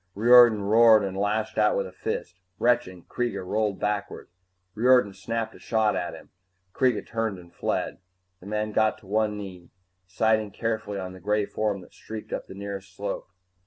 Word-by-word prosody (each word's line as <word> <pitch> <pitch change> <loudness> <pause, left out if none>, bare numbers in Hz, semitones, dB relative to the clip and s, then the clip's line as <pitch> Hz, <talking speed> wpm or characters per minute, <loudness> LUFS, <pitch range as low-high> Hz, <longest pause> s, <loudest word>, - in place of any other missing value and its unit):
Riordan 120 -1 +7
roared 110 +1 +6
and 95 -1 -4
lashed 105 +2 -1
out 105 0 +3
with 100 - 0
a 95 - -9
fist. 90 -1 -5 0.2
Retching, 120 -8 +1
Kreega 100 -5 -3
rolled 105 +1 -1
backward. 105 -1 -3 0.4
Riordan 125 -2 +4
snapped 115 +3 -4
a - - -15
shot 110 -2 +1
at 85 - -3
him. - - -14 0.4
Kreega 130 -2 +1
turned 115 -3 -2
and 85 -1 -15
fled. - - -2 0.4
The 95 - -13
man 105 +1 -2
got 110 0 +2
to - - -18
one 105 +1 0
knee, 90 -4 -9 0.4
sighting 110 +2 +1
carefully 110 -1 -3
on 95 -1 -5
the 95 - -11
gray 105 +1 0
form 105 -2 -2
that 90 - -16
streaked 110 -1 -8
up - - -4
the - - -10
nearest 100 -1 -7
slope. 100 0 -5
105 Hz, 175 wpm, -26 LUFS, 95-110 Hz, 0.4 s, Riordan